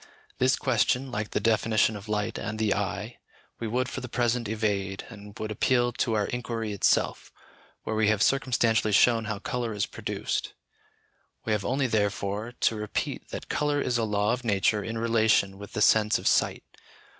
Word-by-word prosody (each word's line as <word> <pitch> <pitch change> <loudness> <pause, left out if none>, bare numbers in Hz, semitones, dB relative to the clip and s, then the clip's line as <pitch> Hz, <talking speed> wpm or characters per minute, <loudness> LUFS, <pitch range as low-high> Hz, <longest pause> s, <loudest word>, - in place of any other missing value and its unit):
This 130 +1 +4
question, 130 +1 +1
like 105 -2 -3
the - - -1
definition 110 -1 +2
of 105 +1 -9
light 105 +1 -1
and 105 0 -4
the 110 -2 +2
eye, 105 -2 -4 0.4
we 115 - -3
would 125 +3 0
for 135 - -5
the 125 - -7
present 120 -1 0
evade, 100 -3 -2
and 105 -2 -11
would 110 0 -4
appeal 120 +3 +2
to 115 -1 -1
our 105 -1 +1
inquiry 115 -3 -3
itself, 100 - +1 0.5
where 110 - -3
we 110 -1 +2
have 105 -1 +3
circumstantially 115 -5 +2
shown 115 +1 +4
how 105 -1 -3
colour 125 -1 -3
is 100 - 0
produced. - - -4 0.9
We 110 - -1
have 105 -2 +1
only 135 +5 0
therefore 105 0 -1
to 115 - +3
repeat 105 -1 -4
that - - -6
colour 145 -1 0
is 125 -4 0
a - - +1
law 105 +1 +1
of 125 0 -4
nature 105 -1 +1
in 115 +2 -4
relation 110 -4 +2
with 100 - -10
the 105 - +1
sense 110 0 +4
of - - -9
sight. - - +2
110 Hz, 180 wpm, -27 LUFS, 105-120 Hz, 0.9 s, This